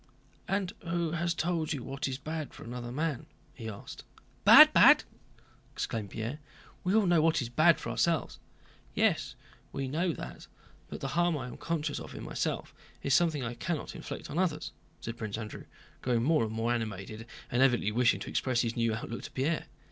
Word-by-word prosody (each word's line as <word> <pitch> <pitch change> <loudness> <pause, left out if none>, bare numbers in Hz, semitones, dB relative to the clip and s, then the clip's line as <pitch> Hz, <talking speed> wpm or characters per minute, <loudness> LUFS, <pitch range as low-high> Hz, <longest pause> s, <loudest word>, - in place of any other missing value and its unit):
"And 195 -1 -1
who 170 -1 -2
has 170 +1 -1
told 165 -2 0
you 135 -5 -5
what 135 +1 -3
is 130 -1 -3
bad 155 +1 -5
for - - -10
another 120 0 -6
man?" 155 +1 -2 0.3
he 115 -3 -7
asked. 100 - -9 0.4
"Bad! - - +10
Bad!" - - +8 0.7
exclaimed 110 -3 -3
Pierre. 115 +9 -4 0.4
"We 185 +3 +1
all 220 -2 +4
know 175 -3 +4
what 165 0 +3
is 120 -4 -3
bad 155 +7 +4
for - - -4
ourselves." 170 -1 0 0.6
"Yes, - - +1 0.4
we 135 -1 -3
know 165 +6 0
that, - - -8 0.4
but - - -7
the - - -2
harm 175 +1 +2
I 130 - -5
am 125 - -8
conscious 155 -3 -2
of - - -9
in - - -7
myself - - -3 0.3
is 140 - +1
something 160 -3 +3
I 115 0 -3
cannot 150 +6 -4
inflict - - -7
on 155 - -1
others," 165 -5 -1 0.3
said 115 0 -5
Prince 110 -3 -4
Andrew, 110 -2 -7 0.4
growing 120 -2 +1
more 155 -3 +3
and 110 - -5
more 115 +2 0
animated 110 0 -4 0.2
and 125 - +2
evidently 120 -5 +3
wishing 120 +2 +3
to - - -5
express 125 -3 +1
his 115 -1 -2
new 115 -2 +1
outlook 115 +1 -5
to - - -9
Pierre. 150 +5 -1
135 Hz, 190 wpm, -30 LUFS, 120-165 Hz, 0.7 s, Bad